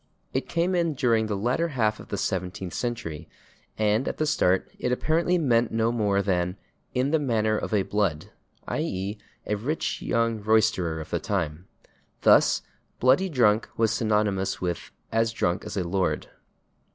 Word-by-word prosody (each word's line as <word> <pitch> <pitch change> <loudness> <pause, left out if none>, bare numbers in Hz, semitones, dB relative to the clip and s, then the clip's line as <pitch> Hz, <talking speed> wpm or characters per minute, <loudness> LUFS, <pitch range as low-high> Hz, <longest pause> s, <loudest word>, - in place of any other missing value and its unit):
It 130 - -2
came 170 +2 +1
in 170 -4 +1
during 115 -4 +2
the 105 -2 -2
latter 125 +11 +1
half 110 -8 0
of - - -11
the 100 - -3
seventeenth 90 -1 -3
century, 115 -11 -4 0.5
and 110 +3 +2
at - - -2
the 155 - +1
start 95 -12 +2
it 125 - -1
apparently 165 +7 +2
meant 120 -7 +2
no 115 +1 +1
more 100 -4 +1
than 90 -1 0 0.4
"in 130 +3 +1
the 160 - +3
manner 110 -6 +1
of - - -3
a 105 -3 +2
blood," 95 -7 -1 0.4
/i. - - -1
e./, 95 +3 -3 0.3
a - - -1
rich 130 +10 -2
young 115 -1 0
roisterer 105 -7 +2
of 80 - -8
the - - 0
time. 90 -4 -3 0.6
Thus, - - +5 0.4
/bloody 135 +10 +4
drunk/ 110 -5 +3
was 115 -1 +3
synonymous 105 -3 0
with 90 -2 -3 0.2
as 115 0 +2
/drunk 90 -4 -1
as 105 -1 -5
a 95 - +1
lord 90 +1 -1
110 Hz, 165 wpm, -26 LUFS, 95-125 Hz, 0.6 s, Thus